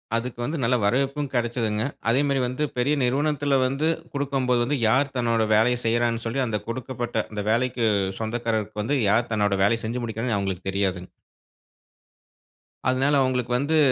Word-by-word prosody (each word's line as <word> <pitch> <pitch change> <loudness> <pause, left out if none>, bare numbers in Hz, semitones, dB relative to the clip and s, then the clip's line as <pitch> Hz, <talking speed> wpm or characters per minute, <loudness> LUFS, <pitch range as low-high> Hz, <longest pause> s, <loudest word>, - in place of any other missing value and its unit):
அதுக்கு 120 +1 -3
வந்து 150 +7 -2
நல்ல 125 +2 +3
வரவேற்பும் 135 +6 0
கெடைச்சதுங்க. 115 -3 0 0.3
அதே 125 - +3
மாரி 140 -1 +1
வந்து 130 +4 -2
பெரிய 130 +4 +2
நிறுவனத்தில 145 +2 +1
வந்து 135 +5 0 0.3
குடுக்கும்போது, 135 -2 0
யார் 135 +4 +2
தன்னோட 115 -2 +1
வேலைய 120 +3 +3
செய்றான்னு 115 0 +1
சொல்லி, 120 +4 -1
அந்த 105 -2 -1
குடுக்கப்பட்ட 120 -2 -3
அந்த 105 -1 -3
வேலைக்கு 120 0 +1 0.3
சொந்தக்காரர்க்கு 110 -2 -2
வந்து, 140 +6 0
யார் 115 +3 +2
தன்னோட 105 -2 +1
வேலைய 115 +3 +3
செஞ்சு 120 +2 -3
முடிக்கிறான்னு 115 -1 -2
அவுங்களுக்கு 95 -1 -3
தெரியாதுங்க. 95 -2 -1 1.8
அதனால 135 +3 +2
அவங்களுக்கு 125 -2 0
வந்து 155 +3 +1
120 Hz, 140 wpm, -24 LUFS, 110-135 Hz, 1.8 s, நல்ல